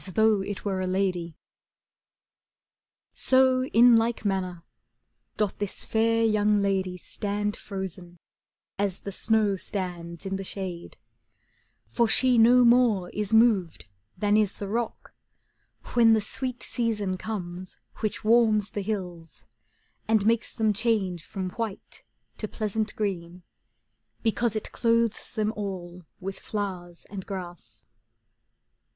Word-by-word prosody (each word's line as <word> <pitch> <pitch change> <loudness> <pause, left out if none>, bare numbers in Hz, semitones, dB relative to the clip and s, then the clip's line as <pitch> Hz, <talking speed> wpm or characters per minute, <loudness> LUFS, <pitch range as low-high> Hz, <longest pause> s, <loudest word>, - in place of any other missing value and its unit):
He - - -5
106 205 0 +1
CANZONIERE 185 -3 -1 1.8
So 260 0 +4
in 240 -1 +6
like 225 0 +1
manner 185 -3 -2 0.7
doth 210 -3 -1
this 205 -2 -4
fair 230 +1 +2
young 210 -1 +3
lady 190 -2 0
Stand 205 +3 -3
frozen, 185 -3 -7 0.6
as 200 -2 -1
the 200 - -6
snow 210 0 +1
stands 175 -3 -4
in 195 0 -2
the 195 - -5
shade, 185 -3 -5 0.9
For 235 -1 +1
she 250 +1 +4
no 245 +2 +7
more 235 -7 +4
is 210 0 -3
moved 220 - +3 0.3
than 205 0 +2
is 210 -2 +2
the 200 - -6
rock, 230 +3 -4 0.8
When 230 -2 +6
the 220 - +4
sweet 250 +4 -4
season 210 -5 -1
comes 185 -3 -6 0.2
which 215 0 -3
warms 220 -3 +4
the 205 - -3
hills, 180 -5 -5 0.3
'« - - -41
And 220 -2 +3
makes 230 +1 +2
them 220 -1 +1
change 200 -6 0
from 185 -2 -5
white 225 -3 -6 0.3
to 215 - -3
pleasant 215 +1 -3
green, 180 -4 -4 0.8
Because 230 0 +1
it 215 - -4
clothes 230 -1 +1
them 215 -1 0
all 180 -4 -6
with 190 +1 -6
flowers 185 -5 -5
and 195 -2 -5
grass. 175 - -8
205 Hz, 120 wpm, -26 LUFS, 185-225 Hz, 1.8 s, no